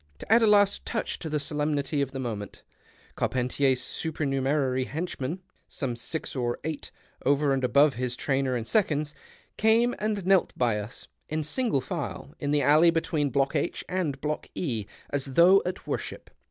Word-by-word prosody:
To - - -8
add 235 - +6
a 225 - +5
last 205 -1 +4
touch - - -2
to 160 - -5
the 150 0 0
solemnity 145 -1 -1
of 135 -1 -1
the 135 - -6
moment, 110 -6 -5 0.5
Carpenticr's 130 +1 +1
supernumerary 135 -3 0
henchmen 160 +2 -4 0.2
(some 130 -4 -3
six 150 +8 -4
or 120 -2 -1
eight, 155 -1 -4 0.3
over 140 +1 +3
and 135 -1 -1
above 140 +3 +4
his 125 +1 -3
trainer 135 -1 0
and 115 -2 -2
seconds) 150 - +1 0.4
came 230 +3 +4
and 210 -3 -1
knelt 190 -1 +3
by 115 -4 +2
us, 105 +4 -8 0.2
in 155 0 -1
single 185 - +1
file, 70 - -5
in 145 - -2
the 145 0 +2
alley 155 +5 +6
between 160 -3 0
Block 135 +2 +1
H 150 +3 -1
and 165 -7 -2
Block 150 +1 -3
E, 115 - -2 0.2
as 135 -1 -2
though 185 +3 +7
at 185 - -5
worship. - - -5
145 Hz, 165 wpm, -27 LUFS, 130-165 Hz, 0.5 s, though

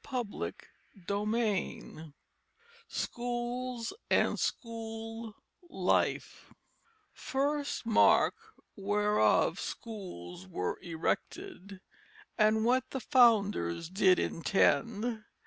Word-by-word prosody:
CHAPTER 245 -6 -4 0.5
III 205 -7 -2 0.7
SCHOOLS 240 0 -3 0.2
AND - - +2
SCHOOL 225 -1 -4 0.3
LIFE - - 0 0.6
_First 285 0 -1
mark 225 -1 +5 0.4
whereof 210 +1 +2
scholes 95 - -7
were 90 -1 -3
erected, 195 - -4 0.5
And 220 0 +3
what 255 +2 +2
the 265 - -3
founders 205 - +3
did 190 -1 +4
intend. 220 +5 +1
220 Hz, 70 wpm, -31 LUFS, 195-240 Hz, 0.7 s, mark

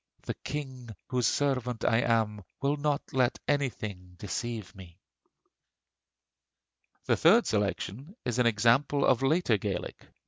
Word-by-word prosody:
The - - -3
King 130 -4 -5 0.2
whose 125 -2 +1
servant 125 -5 0
I 115 - +4
am 110 -3 +1 0.2
will 140 +1 +1
not 145 0 -1
let 130 -1 +2
Anything 105 -10 -2
deceive 110 0 -4
me. 90 -4 -13 2.1
The - - +3
third 210 +9 +5
selection 105 - -2
is 125 0 -1
an 125 - +4
example 120 +6 +3
of 125 - +3
later 135 -4 +2
Gaelic. 95 -3 -5
120 Hz, 125 wpm, -29 LUFS, 105-140 Hz, 2.1 s, third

